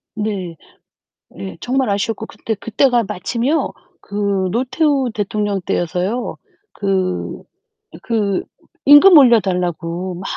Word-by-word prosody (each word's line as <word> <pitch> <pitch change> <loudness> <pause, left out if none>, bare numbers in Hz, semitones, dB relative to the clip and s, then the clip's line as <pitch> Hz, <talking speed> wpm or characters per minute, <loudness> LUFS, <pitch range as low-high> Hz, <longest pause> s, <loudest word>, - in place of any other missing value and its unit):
네. 200 -5 -3 0.8
예. 95 -1 -7
정말 260 +1 0
아쉬웠고 215 +2 -2
그때, 220 - -5
그때가 235 +3 +1
마침요 240 - -1 0.3
그 200 -2 -1
노태우 260 - +1
대통령 205 -2 -2
때여서요. 180 +9 -2 0.4
그 190 -2 -2 0.6
그 210 -5 0 0.4
임금 295 +5 +9
올려달라고 180 - +2
막 175 - -8
210 Hz, 215 characters per minute, -18 LUFS, 185-245 Hz, 0.8 s, 임금